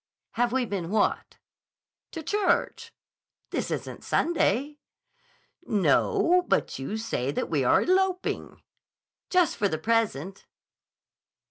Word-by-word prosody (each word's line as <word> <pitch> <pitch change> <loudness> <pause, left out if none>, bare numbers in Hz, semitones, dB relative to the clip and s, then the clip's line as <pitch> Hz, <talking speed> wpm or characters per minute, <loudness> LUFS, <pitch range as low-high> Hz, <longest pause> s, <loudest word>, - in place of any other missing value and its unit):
"Have 240 0 0
we 260 0 +1
been 190 -6 -4
what?" 210 +1 0 0.8
"To 325 - -6
church." 415 +5 0 0.6
"This - - -2
isn't - - -5
Sunday." 295 -3 0 0.9
"No; 360 - +3
but - - 0
you 135 +11 -4
say 220 - -2
that 140 - -3
we 145 -4 +1
are 125 - +4
eloping." 375 0 -1 0.7
"Just 360 -4 +3
for 205 - +2
the 155 - -2
present." 195 -3 -1
235 Hz, 110 wpm, -26 LUFS, -, 0.9 s, are